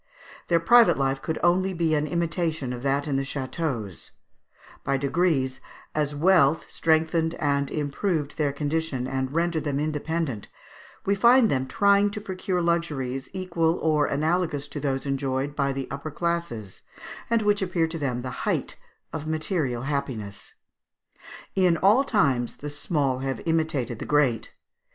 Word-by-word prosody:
Their 170 -1 +3
private 235 +7 +6
life 135 0 0
could 160 - -3
only 185 +2 +2
be 165 -2 +1
an 150 0 +1
imitation 165 -5 -1
of 120 - -6
that 140 +2 0
in 140 -2 0
the - - +1
châteaux; 130 - -4 0.7
by 135 0 +1
degrees 140 -2 0 0.3
as 150 -1 -1
wealth 160 -2 +4
strengthened 160 +1 +1
and 140 -1 0
improved 150 +1 -2
their 150 -2 0
condition, 145 -2 -2
and 130 0 -2
rendered 165 0 0
them 145 -2 -1
independent, 155 -5 -2 0.6
we 200 - +3
find 235 +3 +5
them 130 -1 0
trying 200 +3 +4
to 210 +1 -5
procure 185 -3 -2
luxuries 140 -6 -1
equal 170 -3 0
or 155 -2 +2
analogous 155 -1 0
to - - -5
those 135 -1 -2
enjoyed 135 0 -2
by 140 -1 +1
the 135 -1 -4
upper 140 +3 -5
classes, 160 - -3 0.5
and 230 -1 +2
which 205 -1 +2
appeared 170 -3 0
to 165 - -4
them 125 -4 -2
the 130 - -4 0.2
height - - -2 0.4
of 155 -1 -4
material 155 -6 -1
happiness. 130 -8 -4 1.0
In 180 -3 +3
all 210 - +5
times 140 - +1
the 145 0 -6
small 145 -3 -1
have 135 0 -3
imitated 155 -8 0
the - - -5
great. 130 -7 +2
150 Hz, 150 wpm, -25 LUFS, 135-170 Hz, 1.0 s, private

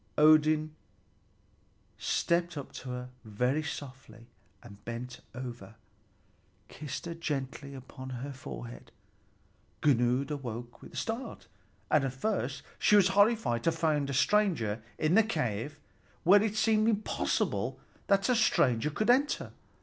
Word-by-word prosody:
Odin 155 0 +5 1.3
stepped 170 -1 0
up 140 - -6
to 130 - -8
her 125 0 -5
very 125 +7 0
softly, 135 -6 -8 0.4
and 100 0 -14
bending 125 +2 -6
over, 120 -3 -7 0.9
kissed 150 0 -6
her 170 - -4
gently 140 -3 -4
upon 130 -1 -8
the 140 0 -5
forehead. - - -9 0.9
Gunnlöd 130 0 +2
awoke 120 -4 -6
with - - -13
a - - -7
start, 230 +2 -4 0.5
and 155 - +4
at 135 -2 -2
first 200 +11 -2 0.2
she 210 - +5
was 195 -2 +6
horrified 200 - +3
to 165 - +3
find 150 -4 0
a - - -2
stranger 150 - +2 0.2
in 155 +2 +1
the 220 - +7
cave 140 - -2 0.5
where 195 +4 +7
it 215 -1 -1
seemed 215 0 +3
impossible 215 -1 -1 0.3
that 195 -1 +3
a 250 - +3
stranger 130 - +3
could 215 +10 +2
enter. 280 +4 +1
145 Hz, 130 wpm, -30 LUFS, 125-195 Hz, 1.3 s, the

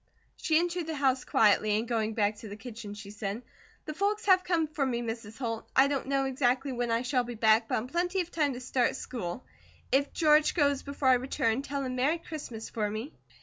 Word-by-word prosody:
She 315 -2 +1
entered 345 0 -1
the 320 - -3
house 265 -2 +1
quietly 210 0 +3
and 225 +2 -2
going 220 -2 -1
back 210 -1 +1
to 220 - -9
the 205 - -7
kitchen 220 -2 -8
she 200 -1 -9
said: 205 +2 -4 0.4
"The 305 - -4
folks 415 +6 -1
have 370 -2 +5
come 340 -3 +1
for 300 -1 -2
me, 240 -3 -1
Mrs. 225 -2 -6
Holt. 230 -4 -4
I 265 +1 +6
don't 280 -2 -2
know 275 0 +1
exactly 265 0 +1
when 245 -1 -2
I 230 +1 +1
shall 250 0 +1
be 240 0 -6
back, 220 +1 +4
but - - 0
in 220 - -3
plenty 355 +6 -1
of 350 -1 -7
time 295 -4 +1
to 245 - -6
start 255 -1 0
school. 235 -2 -5 0.5
If 280 +1 +2
George 305 -1 +4
goes 285 -4 +2
before 280 -1 -1
I - - +7
return, 245 -2 0
tell 280 0 -3
him 255 -1 -3
'Merry 285 +7 +2
Christmas,' 285 -9 -7
for 210 -2 -1
me." 220 +8 -5
255 Hz, 225 wpm, -29 LUFS, 225-295 Hz, 0.5 s, I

